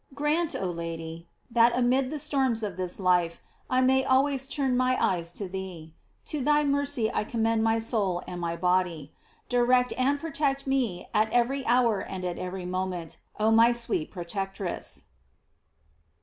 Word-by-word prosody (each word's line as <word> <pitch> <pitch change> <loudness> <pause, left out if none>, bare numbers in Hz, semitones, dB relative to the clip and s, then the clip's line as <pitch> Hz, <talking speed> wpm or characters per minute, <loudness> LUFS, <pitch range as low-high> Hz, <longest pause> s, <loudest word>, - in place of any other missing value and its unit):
Grant, 300 +3 0
oh 185 -2 -2
Lady, 165 0 -6 0.2
that 235 0 +4
amid 255 +1 +2
the 305 - -4
storms 270 -6 0
of 200 -4 -3
this 185 +1 -4
life, 180 -3 +2 0.3
I 255 0 +3
may 265 +1 +4
always 270 0 +2
turn 275 -3 0
my 255 0 +2
eyes 170 -2 0
to 200 - -4
thee. 180 -4 -7 0.3
To 300 - -3
thy 295 +2 +3
mercy 280 -5 +1
I - - 0
commend 225 0 0
my 225 0 +3
soul 205 -6 -1
and 180 -1 -6
my 170 -1 -2
body. 180 -4 0 0.3
Direct 250 0 +3
and 275 +3 +1
protect 285 -3 -1
me 255 -9 -1
at 215 +1 +2
every 260 +3 +1
hour 235 -3 +3
and 185 -1 -5
every 180 +1 -4
moment, 180 -2 -4 0.2
oh 215 +1 +3
my 230 +2 +6
sweet 235 -9 -2
protectress. 195 0 -5
225 Hz, 155 wpm, -27 LUFS, 180-260 Hz, 0.3 s, my